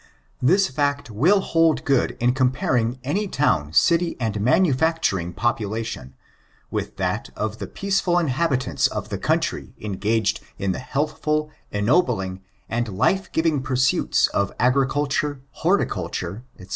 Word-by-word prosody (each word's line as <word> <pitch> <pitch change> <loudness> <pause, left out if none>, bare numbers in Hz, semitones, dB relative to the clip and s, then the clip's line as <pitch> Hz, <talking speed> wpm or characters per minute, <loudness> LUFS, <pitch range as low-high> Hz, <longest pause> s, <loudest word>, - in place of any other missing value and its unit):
This 185 +10 +4
fact 140 -2 -1
will 170 - +3
hold 165 -3 +2
good 135 -3 +1
in 125 +1 +2
comparing 125 -2 +1
any 190 +11 -1
town, 80 - +1
city, 170 - +3
and 110 -3 -2
manufacturing 130 - +2
population, 110 - -3 0.6
with - - -4
that - - -2
of 110 +1 -3
the - - -5
peaceful 195 -3 0
inhabitants 135 - +1
of - - -5
the - - -4
country - - -1
engaged 105 +2 -1 0.2
in 100 -1 -1
the - - -3
healthful, 150 +3 -1 0.2
ennobling, 105 - +1 0.3
and 115 -4 -3
life 190 - +1
giving 160 -4 +1
pursuits 130 - +2
of 100 0 0
agriculture, 140 +3 +1
horti 185 +5 +2
culture, 90 +4 -5
&;c. 95 - -10
130 Hz, 130 wpm, -23 LUFS, 105-155 Hz, 0.6 s, This